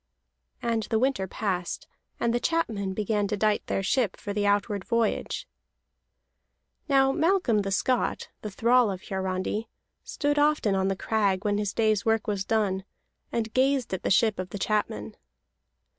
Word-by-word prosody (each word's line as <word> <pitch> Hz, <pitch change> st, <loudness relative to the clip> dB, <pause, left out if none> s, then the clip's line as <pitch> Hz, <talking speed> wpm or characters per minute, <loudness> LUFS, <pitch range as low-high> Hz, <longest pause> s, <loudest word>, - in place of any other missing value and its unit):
And 230 Hz, -1 st, +1 dB
the 225 Hz, -, +2 dB
winter 255 Hz, -5 st, +1 dB
passed, 185 Hz, -3 st, -3 dB, 0.3 s
and 235 Hz, -, +1 dB
the 240 Hz, -, +2 dB
chapmen 220 Hz, -, -1 dB
began 210 Hz, 0 st, 0 dB
to 210 Hz, +1 st, -2 dB
dight 210 Hz, 0 st, +1 dB
their 195 Hz, -, -1 dB
ship 220 Hz, 0 st, +1 dB
for 205 Hz, -, -5 dB
the 205 Hz, 0 st, 0 dB
outward 205 Hz, 0 st, +1 dB
voyage. 230 Hz, 0 st, -1 dB, 1.4 s
Now 270 Hz, -1 st, +5 dB
Malcolm 325 Hz, -, +2 dB
the 195 Hz, -, -3 dB
Scot, 245 Hz, +6 st, 0 dB
the 215 Hz, -, -4 dB
thrall 235 Hz, +3 st, +3 dB
of 190 Hz, -1 st, -5 dB
Hiarandi, 190 Hz, +3 st, -2 dB, 0.3 s
stood 290 Hz, 0 st, 0 dB
often 295 Hz, -8 st, +3 dB
on 190 Hz, 0 st, +1 dB
the 195 Hz, -, 0 dB
crag 200 Hz, -1 st, 0 dB
when 205 Hz, 0 st, +1 dB
his 205 Hz, -2 st, -1 dB
day's 215 Hz, -1 st, +2 dB
work 225 Hz, -1 st, +1 dB
was 200 Hz, -2 st, -1 dB
done, 195 Hz, -3 st, 0 dB, 0.5 s
and 225 Hz, -1 st, -2 dB
gazed 265 Hz, -3 st, +2 dB
at 190 Hz, -, -2 dB
the -, -, -1 dB
ship 215 Hz, 0 st, +3 dB
of 185 Hz, 0 st, -4 dB
the 205 Hz, -, -5 dB
chapmen. 200 Hz, -, -1 dB
210 Hz, 160 wpm, -27 LUFS, 195-235 Hz, 1.4 s, Now